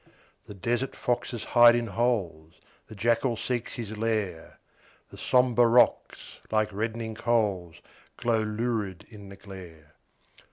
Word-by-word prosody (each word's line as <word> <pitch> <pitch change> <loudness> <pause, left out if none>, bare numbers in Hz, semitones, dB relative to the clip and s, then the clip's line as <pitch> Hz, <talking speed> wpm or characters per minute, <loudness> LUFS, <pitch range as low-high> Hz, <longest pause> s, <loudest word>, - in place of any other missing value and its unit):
The 105 - -10
desert 120 +7 -2
foxes 120 -2 -2
hide 120 -1 +6
in 120 0 0
holes, 100 -8 -2 0.3
The 110 - -11
jackal 115 +3 +1
seeks 125 0 -3
his 110 -2 -6
lair; 105 -7 -3 0.5
The - - -12
sombre 125 -2 +3
rocks, 120 +2 +1
like 110 -1 0
reddening 110 +2 -3
coals, 105 -7 -1 0.4
Glow 115 -2 +1
lurid 105 -4 -3
in 100 -3 -12
the 100 - -10
glare. 90 -6 -13
110 Hz, 125 wpm, -27 LUFS, 100-120 Hz, 0.5 s, hide